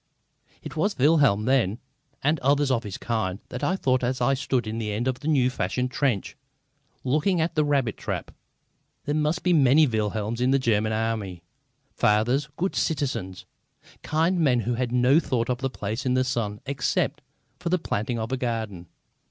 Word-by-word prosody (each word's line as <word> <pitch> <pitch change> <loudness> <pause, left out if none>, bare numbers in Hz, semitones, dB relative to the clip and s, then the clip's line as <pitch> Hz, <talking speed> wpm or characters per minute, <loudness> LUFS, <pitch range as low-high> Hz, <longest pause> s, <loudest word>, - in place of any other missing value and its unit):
It - - -8
was 200 +7 +1
of - - -27
Wilhelm 140 -8 +4
then, 115 -6 +2 0.5
and 150 +2 +2
others 140 +1 +2
of 120 -3 +2
his 105 -4 -6
kind, 110 -5 -2
that 125 - -6
I 185 - +2
thought 130 -8 +1
as 125 +1 -1
I 125 +2 +2
stood 130 -2 -1
in 110 +1 -4
the 105 -2 -2
end 115 +5 -2
of 130 -1 -1
the 145 - -6
new 130 -5 +3
fashion 125 0 -1
trench, 130 -6 -1 0.7
looking 155 +8 +1
at 160 +2 0
the 155 - +2
rabbit 140 -6 0
trap. - - -4 0.7
There 145 - -1
must 155 +3 0
be 180 - +3
many 145 0 +5
Wilhelms 110 -1 -2
in 125 - +3
the 135 - +4
German 110 -4 +1
Army, 110 -6 -2 0.5
fathers, 120 +8 +2
good 190 +3 -1
citizens, 130 - -2 0.6
kindly 165 +3 +1
men 125 -6 +3
who 120 +3 -1
had 120 0 -2
no 125 +4 +4
thought 125 -7 -1
of 125 +2 -3
a 135 - +1
place 110 0 -4
in 125 -1 +1
the 130 - +3
sun 115 -5 -2
except 135 -1 -1 0.4
for 175 - -3
the 185 - +3
planting 120 - -2
of 110 +2 -4
a 130 - 0
garden. 110 -8 -3
125 Hz, 185 wpm, -25 LUFS, 110-145 Hz, 0.7 s, many